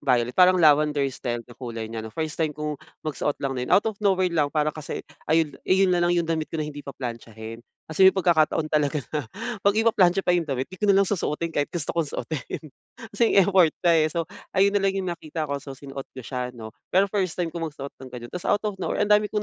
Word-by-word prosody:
violet. 125 -3 +2
Parang 185 0 +6
Lavender 150 -3 +4
style 120 -2 -4
yung 120 - -16
kulay 115 -3 -5
niya 115 - -4
'no. 110 - -7
First 160 0 -3
time 155 -2 0
kong 150 -2 -3 0.3
magsuot 145 -1 -1
lang 135 - 0
din, 125 - -3
out 205 - +5
of 220 -3 -3
nowhere 190 -3 +2
lang. 150 -4 +2
Para 150 0 0
kasi 155 -1 -6 0.3
ayun 160 -1 +3
eh, 190 +1 +4
yun 185 - +3
nalang 175 0 +2
yung 170 - +2
damit 160 -1 -1
ko - - -5
na 155 - -1
hindi 145 -1 -7
pa-plantsahin. 115 -4 -7 0.3
Kasi 190 +5 +5
may - - +2
pagkakataon 160 -4 +2
talaga 150 -1 +1
na 150 -6 -2 0.4
pag 200 - +5
ipaplantsa 195 -5 +4
pa - - +2
yung 170 -2 +1
damit 130 -1 -2
di 185 - -11
ko 210 - +1
nalang 195 0 +5
susuotin 170 -4 -2
kahit 145 -2 0
gusto 170 -4 -2
kong 165 -1 0
suotin. 155 -1 -5 0.5
Kasi 235 - +2
yung 195 0 +6
effort 180 -4 +5
pa 170 - +6
eh, 155 - +3
so 165 +1 -2 0.3
ayun 200 +1 +5
na 205 - +2
lang 195 0 +1
yung 185 -2 -1
nakita 160 -2 -4
ko 140 - -1
so 140 -1 -8
sinuot 135 -1 -8
ko 130 - -6
siya 125 -1 -4
'no. 110 -1 -8 0.2
Pero 190 +2 +6
first 190 -5 0
time 175 -2 -1
ko 170 - -5
magsuot 145 -4 -5
ng 130 - -9
ganun, 120 0 -8
tapos 180 - -5
out 205 - +2
of 205 -3 -2
no-where, 175 +3 -1
ang 210 - -1
dami 210 0 +5
kong 210 - -1
155 Hz, 245 wpm, -25 LUFS, 140-185 Hz, 0.5 s, Parang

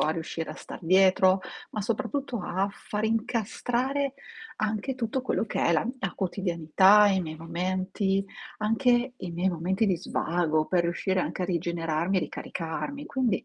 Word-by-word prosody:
a 155 - +3
riuscire 165 0 -4
a - - -7
star - - -9
dietro, 185 +1 +5 0.3
ma 215 - -3
soprattutto 240 +4 -2
a 190 +2 -1
far 210 +1 -4
incastrare 245 +4 0 0.4
anche 215 +5 -1
tutto 250 +1 -2
quello 255 - 0
che - - -2
è 170 - +4
la - - +2
mia 235 -6 -3
quotidianità, 190 +2 +4
i 190 -1 +2
miei 160 -3 -5
momenti, 185 +4 -1 0.3
anche 240 +3 +2
i 185 -7 -6
miei 175 +3 +1
momenti 185 +5 0
di 190 -3 +2
svago, 165 -2 0
per 180 -2 +2
riuscire 175 +2 0
anche 185 - -3
a - - +1
rigenerarmi 170 0 -1
e - - 0
ricaricarmi. 185 - -5
Quindi, 255 -9 0
190 Hz, 155 wpm, -27 LUFS, 175-225 Hz, 0.4 s, dietro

